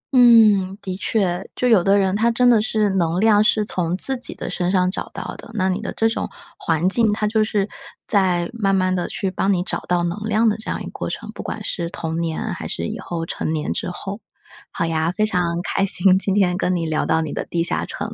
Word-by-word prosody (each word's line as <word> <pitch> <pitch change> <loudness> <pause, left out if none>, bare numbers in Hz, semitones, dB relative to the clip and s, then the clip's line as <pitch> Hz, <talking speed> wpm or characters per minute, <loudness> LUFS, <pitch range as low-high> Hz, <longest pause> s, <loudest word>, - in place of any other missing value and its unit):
嗯， 215 -6 +6
的 185 -1 -4
确， 190 -2 -1
就 250 - 0
有 220 -7 +5
的 195 +2 +4
人 190 -1 +1
他 225 +3 +2
真 245 +2 +2
的 235 -3 +5
是 215 -2 +1
能 175 -2 0
量 210 0 +5
是 215 0 +2
从 180 -3 -1
自 265 +7 +4
己 245 -1 -3
的 - - -6
身 175 0 -1
上 185 -1 +2
找 - - -5
到 - - -6
的， - - -12
那 190 -2 +1
你 185 +3 -1
的 - - -4
这 225 - +3
种 225 - -2 0.3
环 165 +1 0
境， 220 +2 +3
它 210 0 -1
就 215 +1 +2
是 205 -2 0 0.4
在 185 -4 +2
慢 200 -4 +1
慢 185 -1 +1
地 180 - -2
去 195 - -3
帮 195 +1 0
你 180 -2 +1
找 - - -2
到 175 -1 +1
能 175 +4 -2
量 220 +2 +3
的 215 - +2
这 220 - -8
样 - - -2
一 - - -7
个 - - -7
过 - - -5
程， - - -6
不 - - -7
管 - - -5
是 170 -2 -3
童 165 -1 -4
年 165 -1 -3
还 - - -6
是 85 - -4
以 - - -5
后 165 -1 -4
成 160 - -3
年 155 -1 -2
之 - - -3
后。 195 +3 -6 0.5
好 165 - -2
呀， 160 0 0
非 215 +4 0
常 205 -4 0 0.2
开 195 - -1
心， 190 -1 +3
今 195 0 0
天 185 -3 +2
跟 185 0 0
你 170 -1 -1
聊 155 -1 -1
到 160 - +2
你 155 - -5
的 - - -3
地 170 -1 -2
下 170 - -1
城， 210 +2 -5
190 Hz, 270 characters per minute, -21 LUFS, 175-215 Hz, 0.5 s, 嗯